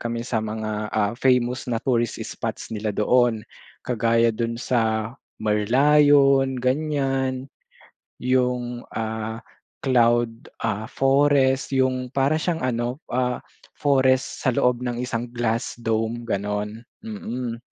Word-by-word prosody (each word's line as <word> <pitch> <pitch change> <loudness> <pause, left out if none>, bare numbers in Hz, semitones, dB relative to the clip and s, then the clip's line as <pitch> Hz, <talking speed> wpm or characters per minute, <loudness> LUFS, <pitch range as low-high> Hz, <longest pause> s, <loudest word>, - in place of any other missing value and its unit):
kami 115 0 -3
sa 115 -3 -1
mga, 110 -1 -3
ah, 105 -1 0
famous 125 -1 +1
na 120 - 0
tourist 120 -3 0
spots - - -5
nila 110 0 -3
doon. 115 0 +2 0.4
Kagaya 115 -1 +2
do'n 115 +1 -2
sa 110 -2 0 0.2
Merlion 135 +5 +4
ganyan, 135 -1 0 0.7
'yong, 125 -1 -1
ah, 110 +1 -4 0.4
Cloud, 120 -3 +2
ah, 110 -1 -1
Forest 135 0 +2
'yong 130 -1 +1
para 140 +3 +2
siyang 165 0 -1
ano, 120 +2 -1
ah, 125 0 0 0.4
forest 130 -2 +2
sa 130 - +3
loob 125 -1 +2
ng 120 -1 -3
isang 120 -1 -3
glass 115 -1 -1
dome, 115 +1 -1
gano'n, 105 +1 -3 0.2
mm. 125 - -5
120 Hz, 115 wpm, -23 LUFS, 115-130 Hz, 0.7 s, Merlion